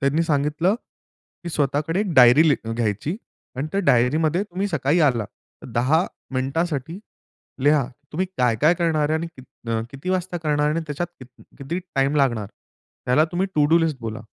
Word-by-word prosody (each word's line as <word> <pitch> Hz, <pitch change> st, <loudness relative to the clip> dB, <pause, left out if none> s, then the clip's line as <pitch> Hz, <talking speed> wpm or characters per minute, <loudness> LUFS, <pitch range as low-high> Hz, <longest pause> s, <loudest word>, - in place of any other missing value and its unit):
त्यांनी 140 Hz, +4 st, +2 dB
सांगितलं, 155 Hz, +4 st, +1 dB
की 205 Hz, -6 st, -15 dB
"स्वतःकडे 150 Hz, +4 st, 0 dB
एक 205 Hz, -4 st, -2 dB
डायरी 125 Hz, +4 st, +7 dB
ली 145 Hz, -, +4 dB, 0.2 s
घ्यायची 115 Hz, -, -2 dB, 0.4 s
अन् 135 Hz, +3 st, -2 dB
त्या 200 Hz, -, +1 dB
डायरीमध्ये 155 Hz, +9 st, +3 dB
तुम्ही 195 Hz, 0 st, -3 dB
सकाळी 160 Hz, -1 st, +1 dB
आला, 120 Hz, -4 st, -1 dB, 0.4 s
तर -, -, -9 dB
10 140 Hz, -, +2 dB, 0.3 s
मिनिटांसाठी 150 Hz, +4 st, -2 dB, 0.7 s
लिहा, 145 Hz, -1 st, +4 dB, 0.3 s
तुम्ही 185 Hz, +5 st, -1 dB
काय-काय 125 Hz, +6 st, +3 dB
करणार 160 Hz, -4 st, +1 dB
आहे? 155 Hz, -, +2 dB
आणि 170 Hz, -, -4 dB
की 130 Hz, -, -11 dB, 0.3 s
न 115 Hz, -1 st, 0 dB
किती 140 Hz, +7 st, -5 dB
वाजता 185 Hz, -1 st, -1 dB
करणार 150 Hz, -2 st, 0 dB
आहे? 150 Hz, -, 0 dB
आणि 165 Hz, -, -1 dB
त्याच्यात 150 Hz, +3 st, -3 dB
कित 130 Hz, -, -11 dB, 0.3 s
किती 140 Hz, +6 st, -4 dB, 0.2 s
टाईम 135 Hz, +1 st, +1 dB
लागणार? 120 Hz, -7 st, +1 dB, 0.6 s
त्याला 135 Hz, +5 st, +4 dB
तुम्ही 180 Hz, +2 st, 0 dB
टु 150 Hz, -, +4 dB
डू 165 Hz, -, +6 dB
लिस्ट 160 Hz, -4 st, 0 dB
बोला." 110 Hz, -1 st, -5 dB
150 Hz, 170 wpm, -23 LUFS, 130-170 Hz, 0.7 s, डायरी